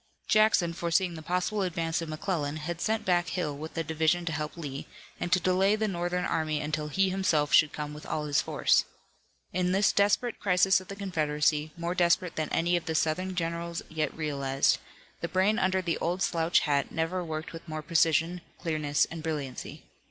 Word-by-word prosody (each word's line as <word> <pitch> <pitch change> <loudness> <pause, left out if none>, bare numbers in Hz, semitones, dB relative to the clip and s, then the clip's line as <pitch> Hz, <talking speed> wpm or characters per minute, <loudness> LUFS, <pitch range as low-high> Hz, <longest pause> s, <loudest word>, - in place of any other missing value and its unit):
Jackson, 215 -6 +4
foreseeing 170 +1 0
the 160 - -7
possible 180 +5 -1
advance 165 -3 -1
of 165 - -5
McClellan, 155 -2 -2
had 165 +2 -5
sent 220 0 0
back 175 -1 +2
Hill 165 -5 -2
with 155 +3 -8
a 165 - 0
division 160 +2 +1
to 170 - -1
help 150 +1 -4
Lee, 140 -4 -6 0.3
and 175 - -3
to 185 - +5
delay 185 +3 +3
the 215 0 0
Northern 180 -1 -1
army 155 -2 0
until 150 0 -2
he 190 +5 +1
himself 155 -6 +1
should 155 -1 +6
come 150 0 -5
with 150 - -10
all 150 - -2
his 145 -1 +2
force. - - +2 0.7
In 180 0 +1
this 195 +1 +4
desperate 205 +4 +2
crisis 190 0 +3
of 185 - -14
the 200 - -7
Confederacy, 155 -5 0
more 170 +1 -2
desperate 175 -1 +2
than 155 -1 -2
any 175 +1 +1
of 170 -2 -1
the 160 -2 -2
Southern 180 +4 0
generals 170 0 -3
yet 155 -2 -1
realized, 140 -3 +1 0.4
the - - -2
brain 195 +4 +2
under 190 0 +1
the 170 -2 -1
old 180 +2 -1
slouch 165 0 +2
hat 145 -2 0
never 165 +3 -1
worked 160 -1 -5
with 165 +1 -9
more 155 -1 -5
precision, 165 +2 +2 0.2
clearness 155 -3 +1
and 165 -1 -6
brilliancy. 150 -5 -5
165 Hz, 190 wpm, -29 LUFS, 155-185 Hz, 0.7 s, should